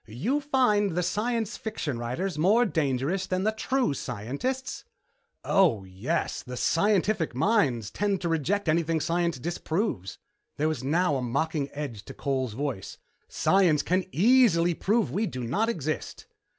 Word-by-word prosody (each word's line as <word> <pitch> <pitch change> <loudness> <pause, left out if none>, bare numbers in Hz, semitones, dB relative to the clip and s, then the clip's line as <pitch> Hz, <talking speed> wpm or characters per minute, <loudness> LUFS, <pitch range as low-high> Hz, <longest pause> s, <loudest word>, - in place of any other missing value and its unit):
"You 175 - -1
find 210 - +2
the 180 - +2
science 225 +3 -1
fiction 160 - -4
writers 135 +10 -3
more 200 +10 +4
dangerous 160 - 0
than 185 0 -1
the 215 - +2
true 250 - 0
scientists?" 140 - -4 0.6
"Oh, 170 - +3
yes. 95 0 -2
The 125 0 -8
scientific 190 - +1
mind 135 - +1
tends 200 -1 0
to 175 - -1
reject 170 +5 0
anything 165 0 +2
science 170 0 0
disproves." 160 - -3 0.4
There 155 - +1
was 155 -4 -2
now 155 +1 +2
a - - -3
mocking 140 +4 -1
edge 135 -9 -6
to - - -10
Cole's 130 -4 -2
voice. 130 -6 -4 0.3
"Science 180 -6 +3
can 185 +2 +1
easily 190 -5 +4
prove 215 +6 +1
we 215 +2 0
do 130 -7 -5
not 205 - 0
exist." 155 - -4
170 Hz, 145 wpm, -27 LUFS, 135-205 Hz, 0.6 s, more